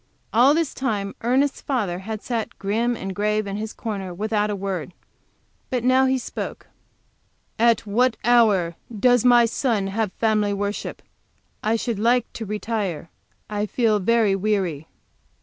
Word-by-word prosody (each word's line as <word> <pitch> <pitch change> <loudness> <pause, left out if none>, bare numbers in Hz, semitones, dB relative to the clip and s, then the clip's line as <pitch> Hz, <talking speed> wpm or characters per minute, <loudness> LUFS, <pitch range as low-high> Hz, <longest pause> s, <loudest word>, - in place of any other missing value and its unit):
All 255 +6 +6
this 325 -3 0
time 205 -7 -2
Ernest's 265 +4 +1
father 205 -10 -1
had 215 +2 -6
sat 230 -3 -3
grim 230 +5 0
and 195 -2 -5
grave 210 +2 0
in 200 0 -4
his 215 +1 -4
corner, 200 -5 -5
without 210 +1 0
a 205 - -1
word. 190 -3 -4 0.7
But 250 -2 -1
now 260 +1 +4
he 260 0 +2
spoke. 245 - -6 0.9
"At 235 0 +4
what 230 +3 +2
hour 210 -8 +4 0.2
does 245 0 +4
my 240 -1 +6
son 230 -3 0
have 220 -2 0
family 215 -2 +1
worship? 205 +1 -4 0.6
I 220 +2 +1
should 230 -2 -2
like 240 +3 +3
to 225 - -6
retire. 210 -6 -3 0.4
I 210 0 -2
feel 220 -2 +2
very 215 0 +3
weary." 190 -7 -1
215 Hz, 150 wpm, -23 LUFS, 200-240 Hz, 0.9 s, All